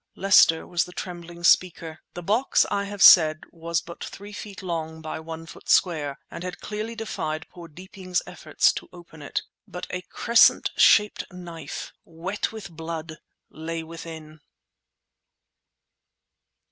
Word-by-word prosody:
Lester 185 -4 +5
was 175 -1 0
the 180 - -12
trembling 175 -1 -8
speaker. 170 -2 +2 0.2
The 175 - -6
box, 220 +9 +2
I 200 0 0
have 200 0 -1
said, 155 -3 +8
was 170 0 -2
but 170 - -10
three 205 +1 -9
feet 205 -1 -8
long 160 -3 -4
by 160 0 -6
one 160 0 -8
foot - - -13
square, 150 -6 +2
and 170 - -7
had 180 -1 -6
clearly 215 +2 -5
defied 160 -8 -4
poor 175 -2 -11
Deeping's 185 +2 -4
efforts - - +1
to - - -8
open 170 -3 -14
it. 145 - -3 0.2
But 180 - -7
a 180 - -3
crescent 235 +5 +4
shaped 210 -2 +4
knife, 170 -4 -8
wet 175 +5 -4
with 220 -5 -9
blood, 160 -1 -6 0.3
lay 165 +1 -5
within! 160 -1 -10
170 Hz, 140 wpm, -25 LUFS, 160-190 Hz, 0.3 s, said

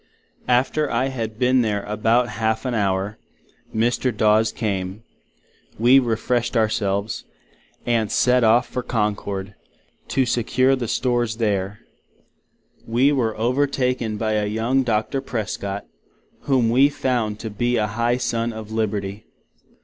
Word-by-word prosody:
After 130 +4 +2
I 130 +3 0
had 115 -4 -4
been 125 +1 +3
there 105 -3 -1
about 115 +4 +1
half 110 0 -1
an 125 - -1
Hour, 100 -1 -1 0.5
Mr. 120 +3 +1
Daws 110 0 +3
came; 100 -2 -3 0.7
we 125 +4 +6
refreshid 120 0 -1
our 110 -1 +3
selves, 100 +1 -2 0.6
and 115 -3 +1
set 125 0 +3
off 115 +2 +4
for 125 - -3
Concord, 105 -4 -2 0.5
to 135 - +1
secure 130 +3 +2
the 125 -3 -4
Stores, 120 -1 0
&c. - - -13
there. 105 -1 -1 1.1
We 125 +5 +3
were 115 -6 0
overtaken 125 -2 0
by 110 0 -1
a 105 -1 0
young 115 +5 +1
Docter 115 +2 -1
Prescot, 100 -5 -4 0.6
whom 130 -5 +2
we 135 +4 +5
found 120 -7 -1
to 110 - -5
be 120 +4 0
a 105 - +2
high 120 +3 0
Son 120 -1 -1
of 110 -1 -8
Liberty. 105 -1 -3
115 Hz, 135 wpm, -22 LUFS, 105-125 Hz, 1.1 s, we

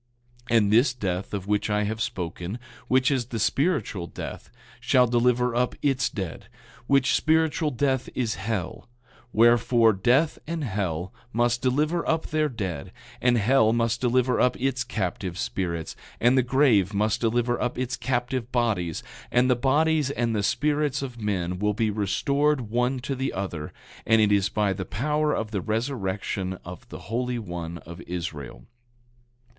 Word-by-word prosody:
9:12 115 - +5
And 105 -2 +3
this 120 +3 +5
death 95 -5 -3
of 100 -2 -4
which 105 +1 0
I 105 0 +1
have 110 +2 -3
spoken, 90 -1 -4 0.3
which 130 +2 +3
is 130 -4 0
the 120 - -4
spiritual 115 - 0
death, - - -8 0.3
shall 125 -1 +4
deliver 125 0 +2
up 125 +1 0
its 135 -2 +2
dead; 95 -6 -6 0.4
which 135 0 +3
spiritual 160 0 +2
death 130 -1 0
is 120 -4 0
hell; 100 0 -4 0.4
wherefore, 115 0 +4
death 125 - +2
and 165 -1 -3
hell 95 - -2 0.2
must 120 +1 +1
deliver 150 +6 +1
up 160 0 +1
their 155 -1 +1
dead, 95 - -5 0.3
and 125 -1 +3
hell 110 0 +4
must 115 0 0
deliver 125 0 +2
up 125 - +2
its 130 -1 0
captive 95 -3 -3
spirits, 85 -4 -3 0.2
and 120 +2 +4
the 130 - +5
grave 120 -7 +3
must 105 +1 +1
deliver 120 +1 +1
up 125 - -1
its 125 0 -2
captive 125 -1 -2
bodies, 105 -10 0 0.3
and 125 +1 +3
the - - +4
bodies 150 +3 +2
and 120 -5 -1
the 105 - +1
spirits 145 +6 0
of 120 -4 -7
men 90 -4 -2
will 105 0 +1
be 110 0 +1
restored 130 +5 0
one 125 +3 +1
to 130 +2 -4
the 135 +1 -2
other; 85 -6 -4 0.4
and 110 0 +5
it 105 -1 +4
is 100 -1 +3
by 105 -2 +1
the 95 0 -4
power 150 - 0
of 110 -1 -2
the 100 -4 -2
resurrection 105 -4 -2
of 90 0 -10
the - - -9
Holy 125 +2 -2
One 85 -5 -5
of 85 +1 -9
Israel. 80 -8 -6
115 Hz, 160 wpm, -25 LUFS, 100-130 Hz, 0.4 s, 9:12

